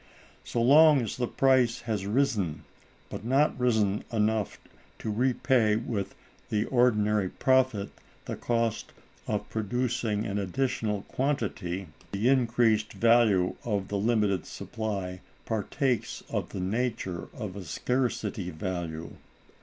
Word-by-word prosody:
So 115 - -1
long 150 +2 +7
as 110 - -4
the 120 -1 -1
price 130 -3 +3
has 105 -4 -3
risen, 105 - 0 0.5
but - - -6
not 135 +6 +2
risen 110 -5 +2
enough 110 -2 0 0.4
to 110 - -4
repay 125 -1 +2
with 105 -3 -3 0.3
the 105 0 +1
ordinary 105 -6 +2
profit 130 -5 +2 0.3
the - - -4
cost 115 -2 -1 0.3
of - - -2
producing 110 -1 -1
an 105 -1 -2
additional 105 0 -1
quantity, 100 -9 -2 0.3
the 105 +5 +2
increased 115 -4 +2
value 115 -6 +4
of 100 -4 -2
the 100 - -1
limited 105 -4 +1
supply 95 -4 -4 0.2
partakes 120 +4 -1
of - - -2
the - - -6
nature 95 -3 -2
of 105 -5 -6
a 100 - -6
scarcity 115 - -1
value. 85 -1 -5
110 Hz, 120 wpm, -28 LUFS, 100-125 Hz, 0.5 s, long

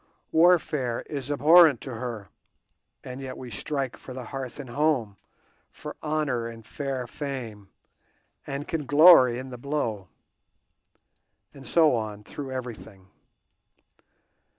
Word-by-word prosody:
Warfare 155 -7 +2
is 140 -2 -5
abhorrent 150 -1 +6
to 130 - -7
her, 115 -3 -6 0.7
and 130 +1 -8
yet 130 -1 -7
we 125 -2 -9
strike 135 +3 -3
out - - -15
for 130 - -9
hearth 130 0 -7
and 130 -4 -8
home, 135 -7 0 0.5
for - - -9
honour 150 -6 -1
and 115 -1 -10
fair 135 0 -4
fame, 120 -7 -7 0.8
and 140 +2 -5
can 150 -4 -3
glory 145 -5 +7
in 130 +1 -7
the 125 - -8
blow. 120 -8 -3 1.5
And 135 -1 -12
so 160 -4 +4
on, 105 -3 -3
through 135 +4 -7
everything. 110 -7 -8
130 Hz, 125 wpm, -26 LUFS, 115-145 Hz, 1.5 s, glory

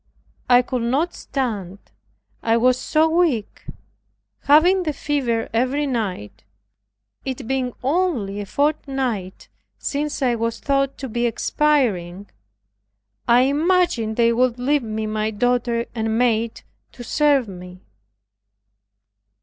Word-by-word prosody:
I 245 0 +6
could 250 0 -3
not 275 +9 0
stand, 210 -9 -4 0.6
I 225 0 +2
was 250 +2 +3
so 315 +1 +2
weak, 320 - 0 0.8
having 345 +6 +5
the 310 -4 -2
fever 260 -6 -1
every 260 +5 +1
night, 205 - -4 0.8
it 260 -2 -5
being 260 -2 -1
only 265 - 0
a 200 - -7
fortnight 270 -8 -2 0.3
since 295 0 -3
I 250 -2 +2
was 230 0 -2
thought 275 -1 0
to 270 - -5
be 240 +1 0
expiring. 210 -9 0 1.0
I 240 +1 +6
imagined 290 -5 +1
they 235 0 +3
would 250 0 +1
leave 280 +4 +1
me 220 -1 -4
my 215 0 -1
daughter 235 +1 0
and 220 -1 -1
maid 230 -2 0 0.3
to 240 - -9
serve 285 -1 +2
me. 180 -1 -11
245 Hz, 115 wpm, -21 LUFS, 220-285 Hz, 1.0 s, I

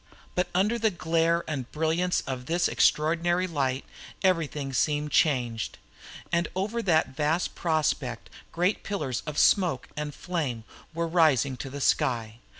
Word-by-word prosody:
But 180 0 0
under 210 +6 +2
the 220 0 +3
glare 165 -1 +1
and 135 -6 -4
brilliance 160 +3 +1
of 130 -2 -6
this 170 +1 +2
extraordinary 170 +4 +2
light 135 -6 -1 0.4
everything 150 -7 0
seemed 150 +2 0
changed. 120 -7 +1 0.6
All 170 0 +2
over 210 +5 -1
that 160 -9 +2
vast 155 +4 0
prospect 155 -7 -1 0.2
great 180 +5 0
pillars 150 - -3
of 150 -1 -4
smoke 175 - +3
and 150 -1 -4
flame 145 -10 -3 0.3
were 165 0 -2
rising 155 -6 +3
to 135 - -6
the 140 +2 -6
sky. 115 -4 +1
160 Hz, 140 wpm, -27 LUFS, 135-175 Hz, 0.6 s, the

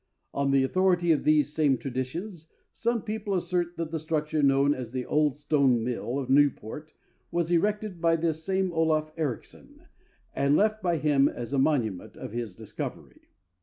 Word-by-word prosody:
On 140 0 0
the 135 -1 +4
authority 175 +3 +2
of 155 - +2
these 150 -1 +3
same 145 -4 +2
traditions, 155 - -5 0.3
some 235 -1 -1
people 210 -2 -3
assert 175 -1 -1
that 165 -1 -3
the 165 - -2
structure 155 0 -1
known 140 0 +4
as 125 -5 -6
the 130 -1 -3
"old 150 -2 +1
stone 140 -5 +2
mill 125 +1 -3
of 135 -3 -3
Newport" 145 +2 +1 0.3
was 170 -1 -1
erected 205 +1 0
by 165 -1 +4
this 160 -1 -1
same 190 0 0
Olaf 155 -1 +1
Ericsson, 145 -8 -6 0.5
and 140 +1 +2
left 215 +1 +2
by 175 -2 +1
him 145 -2 +3
as 120 +2 -6
a 140 - +2
monument 120 - 0
of - - -7
his 115 -4 -5
discovery. - - -8
155 Hz, 165 wpm, -27 LUFS, 135-175 Hz, 0.5 s, the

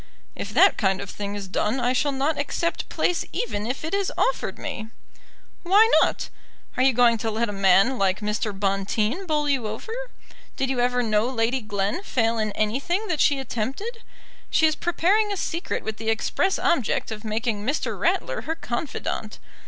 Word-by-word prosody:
"If - - -5
that - - +6
kind 190 -3 +2
of 200 - -6
thing 205 0 -5
is 200 -2 -5
done 210 +6 0
I 245 +1 +1
shall 285 +3 +1
not 280 +3 0
accept 335 +4 -2
place 355 - 0
even 215 - -2
if 260 +5 -3
it 320 - -4
is 400 -1 0
offered - - 0
me." 220 -3 -5 0.7
"Why 400 +5 +6
not? - - 0 0.5
Are - - 0
you 265 +1 +5
going 235 -2 +4
to 225 - -1
let 220 +1 -1
a - - -2
man 195 +5 +4
like 190 -1 +2
Mr. 210 0 -1
Bonteen 205 - -1
bowl 300 -2 +1
you 265 -6 +1
over? 220 - -6 0.6
Did 265 0 0
you 255 - -1
ever 245 0 +2
know 215 +1 +2
Lady 245 +1 0
Glen 205 - -2
fail 230 - 0
in 215 -1 0
anything 280 - -1
that 320 -4 0
she 285 - +4
attempted? 270 - -4 0.5
She 320 - +4
is 310 - +4
preparing 385 +6 +1
a 400 - -2
secret 340 -1 -3
with 220 0 -4
the 225 0 -3
express 225 - +1
object 260 -7 +1
of 215 0 -6
making 220 -1 -2
Mr. 280 +7 -1
Ratler - - 0
her 320 - -3
confidant. 285 -2 -4
245 Hz, 185 wpm, -24 LUFS, 215-315 Hz, 0.7 s, that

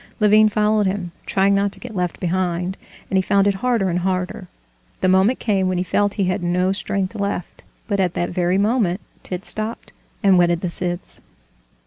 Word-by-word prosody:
Levin 215 0 +5
followed 210 -1 +2
him, 190 -2 -3 0.2
trying 195 +1 +3
not 200 0 +1
to - - -6
get 240 -3 -9
left 180 -2 -2
behind, 180 0 -1 0.4
and 190 - +3
he - - +3
found 200 +1 +2
it 200 - +3
harder 225 0 0
and 175 -1 0
harder: 185 +2 -2 0.5
the 185 - +2
moment 190 +7 +4
came 195 -4 0
when 185 -1 0
he 180 - 0
felt 205 +2 0
he 200 - 0
had 185 -1 0
no 180 +2 +1
strength 195 0 -2
left, 200 -4 -4 0.3
but 200 -2 -1
at 180 -2 +1
that 175 - -1
very 180 +1 +1
moment 205 -3 +1 0.2
Tit 180 +1 -6
stopped 215 +2 -4 0.3
and 190 -2 +5
whetted 175 -1 +2
the 180 - -2
scythes. 175 0 -3
190 Hz, 190 wpm, -21 LUFS, 180-205 Hz, 0.5 s, Levin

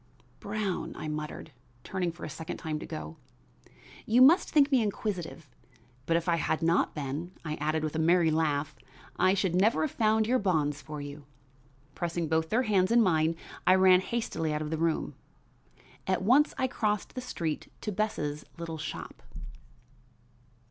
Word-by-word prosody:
"Brown," 205 -2 -3
I - - -6
muttered, 150 +1 -5 0.3
turning 180 -3 -2
for 170 - -9
a - - -5
second 160 +2 -6
time 155 -2 -4
to - - -8
go. 75 +1 -7 0.9
"You 240 +3 +6
must 320 +7 +6
think 295 -1 +4
me 260 -3 +4
inquisitive, 190 -7 -3 0.6
but 165 - +3
if 170 - -3
I 170 -1 +3
had 160 - -1
not 165 +1 +2
been," 150 +5 -4
I 155 - -2
added 155 +1 -1
with 155 0 -3
a - - 0
merry 165 0 +4
laugh, 155 -2 0 0.4
"I 185 +1 +4
should 190 -3 0
never 200 +6 +3
have 310 - -1
found 220 -1 +2
your 250 +3 +2
bonds 150 -7 0
for 150 +2 -7
you." 145 0 -9 0.7
Pressing 170 -1 -2
both 160 +1 0
their 240 +7 +2
hands 200 -3 +2
in 235 0 +6
mine 165 -3 +2 0.3
I 185 - +7
ran 185 -1 +6
hastily 190 -8 -2
out 150 0 -1
of 150 - -5
the 160 - -1
room. 165 -1 0 0.9
At 185 0 0
once 270 +9 +4
I - - +1
crossed 210 -5 -1
the 255 - -5
street 165 -11 -4
to 210 - -3
Bess' 165 -8 -2
little 165 -1 -6
shop. 105 - -7
170 Hz, 170 wpm, -29 LUFS, 155-210 Hz, 0.9 s, I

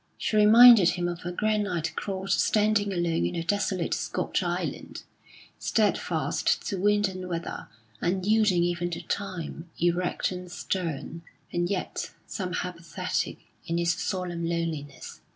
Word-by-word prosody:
She - - -2
reminded 215 -2 +8
him 175 -1 -1
of 175 -1 -5
a 175 - -2
granite 205 -4 -1
cross 195 -1 -2
standing 210 -1 +2
alone 175 - 0
in - - -5
a 165 - -2
desolate 190 -1 0
Scotch - - -1
island, - - -4 0.6
steadfast - - 0
to 195 - -2
wind 205 0 +3
and 185 -1 -6
weather, 170 -1 -4 0.3
unyielding 190 0 +2
even 175 0 -1
to 170 - -5
time, 175 -4 -4
erect 175 +2 0
and 180 -1 -7
stern, 165 -3 -3 0.3
and 175 0 0
yet 195 -2 -3
somehow 180 -2 -3
pathetic 170 -1 -3 0.3
in 170 - -1
its 170 -1 +2
solemn 180 -3 -3
loneliness. 165 -5 -4
180 Hz, 135 wpm, -27 LUFS, 170-200 Hz, 0.6 s, reminded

